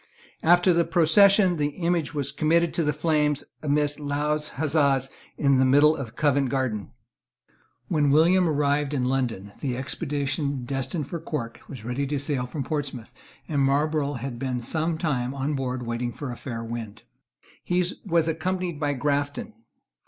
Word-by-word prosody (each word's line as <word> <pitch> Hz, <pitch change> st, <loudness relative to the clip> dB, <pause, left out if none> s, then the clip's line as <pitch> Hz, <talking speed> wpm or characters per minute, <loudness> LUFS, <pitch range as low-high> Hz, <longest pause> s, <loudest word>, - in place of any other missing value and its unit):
After 175 Hz, +2 st, +5 dB
the 170 Hz, 0 st, +3 dB
procession, 185 Hz, +2 st, +5 dB
the 145 Hz, -1 st, +1 dB
image 170 Hz, -4 st, 0 dB
was 140 Hz, -2 st, -2 dB
committed 160 Hz, +3 st, +2 dB
to 170 Hz, -, +1 dB
the 150 Hz, -, +2 dB
flames, 150 Hz, -1 st, +1 dB, 0.2 s
amidst 145 Hz, 0 st, 0 dB
loud 150 Hz, +1 st, -1 dB
huzzas, 140 Hz, -3 st, +1 dB, 0.3 s
in 140 Hz, -2 st, +3 dB
the -, -, +5 dB
middle 145 Hz, +4 st, +5 dB
of 125 Hz, -6 st, -7 dB
Covent 140 Hz, -3 st, +2 dB
Garden, 125 Hz, -7 st, -2 dB, 1.0 s
When 150 Hz, -2 st, +2 dB
William 170 Hz, +4 st, +4 dB
arrived 145 Hz, -1 st, +1 dB
in 125 Hz, -2 st, 0 dB
London, 120 Hz, -7 st, -1 dB
the 130 Hz, -4 st, -2 dB
expedition 140 Hz, -1 st, -2 dB
destined 135 Hz, +4 st, -3 dB
for 170 Hz, -, -5 dB
Cork, 140 Hz, -8 st, -5 dB
was 120 Hz, -6 st, -9 dB
ready 130 Hz, +4 st, -2 dB
to 145 Hz, +1 st, -1 dB
sail 135 Hz, -3 st, -1 dB
from 135 Hz, +3 st, -4 dB
Portsmouth, 135 Hz, -5 st, -4 dB, 0.3 s
and 145 Hz, -3 st, 0 dB
Marlborough 145 Hz, +1 st, +1 dB
had 125 Hz, -2 st, -5 dB
been 130 Hz, -1 st, -2 dB
some 160 Hz, +6 st, -1 dB
time 135 Hz, -6 st, -1 dB
on 140 Hz, +2 st, -1 dB
board 130 Hz, -2 st, -3 dB
waiting 120 Hz, +1 st, -2 dB
for 140 Hz, 0 st, -6 dB
a -, -, -5 dB
fair 115 Hz, -2 st, -6 dB
wind. 115 Hz, -2 st, -6 dB, 0.6 s
He 180 Hz, 0 st, +1 dB, 0.2 s
was 170 Hz, -4 st, +2 dB
accompanied 180 Hz, 0 st, -2 dB
by 145 Hz, -2 st, 0 dB
Grafton. 145 Hz, -, -2 dB
145 Hz, 160 wpm, -25 LUFS, 130-155 Hz, 1.0 s, After